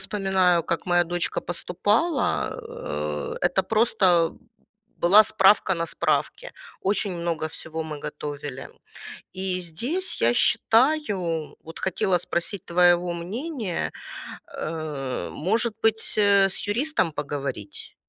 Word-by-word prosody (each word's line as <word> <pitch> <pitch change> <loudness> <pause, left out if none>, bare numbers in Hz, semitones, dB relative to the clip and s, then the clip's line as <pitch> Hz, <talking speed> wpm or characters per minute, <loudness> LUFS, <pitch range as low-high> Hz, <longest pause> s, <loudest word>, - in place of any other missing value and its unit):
вспоминаю, 190 -4 +2
как 170 - -2
моя 175 0 +3
дочка 175 +1 -1
поступала. 190 - 0
Э, 75 0 -4
это 180 +2 +2
просто 190 -6 +3 0.7
была 200 +5 +7
справка 195 -2 +4
на 165 0 -2
справке. - - -1 0.3
Очень 195 -2 0
много 165 -2 -2
всего 160 0 -6
мы 150 -2 -7
готовили. 145 -3 -6 0.7
И 185 -1 -2
здесь 240 - -2
я 115 +1 +4
считаю, 210 - +1
вот 165 - -10
хотела 185 -1 +1
спросить 175 +3 -3
твоего 175 0 +3
мнения, 210 - -4 0.7
э, 150 -5 -4
может 220 +7 0
быть, 225 0 +2
э, 200 -2 +5
с 190 - -1
юристом 235 - +1
поговорить? 140 -8 -5
180 Hz, 110 wpm, -24 LUFS, 160-205 Hz, 0.7 s, была